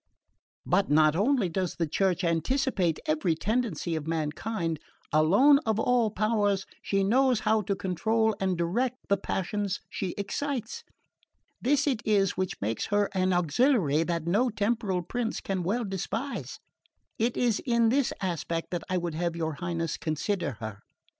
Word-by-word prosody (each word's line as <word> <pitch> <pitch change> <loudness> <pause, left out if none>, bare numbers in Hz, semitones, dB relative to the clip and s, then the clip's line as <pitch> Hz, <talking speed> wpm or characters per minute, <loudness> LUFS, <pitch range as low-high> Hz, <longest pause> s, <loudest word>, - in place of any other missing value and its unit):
"But 200 - +2
not 155 +1 +4
only 225 +2 +2
does 180 +1 -2
the 170 - 0
Church 185 +3 0
anticipate 175 - +1
every 160 +2 +1
tendency 200 -4 -1
of 155 -1 -4
mankind; 165 +2 -2 0.3
alone 200 - +6
of 220 -1 0
all 240 -1 +3
powers 205 -2 +1 0.2
she 195 -1 0
knows 250 +2 +3
how 215 0 +2
to 200 0 -1
control 220 +5 +1
and 190 -2 0
direct 230 +10 0
the 200 - +4
passions 195 +1 -2
she 185 -3 -3
excites. 255 - -3 0.8
This 285 +2 +2
it 260 -6 0
is 200 -3 +3
which 185 0 -2
makes 110 +2 -2
her 205 0 +1
an 185 -1 +1
auxiliary 175 - +2
that 170 -1 -1
no 210 +9 +2
temporal 205 -4 -1
prince 230 +5 -2
can 190 -2 -2
well 215 +7 -1
despise. 220 +8 -4 0.6
It 235 +2 0
is 235 -4 +1
in 235 -2 +3
this 270 +2 +2
aspect 170 -2 -2
that 175 - -2
I 185 - +1
would 170 -2 -2
have 170 +1 -1
your 160 -2 -2
Highness 165 -2 -2
consider 160 +1 -2
her. 110 -2 -7
195 Hz, 155 wpm, -28 LUFS, 170-225 Hz, 0.8 s, alone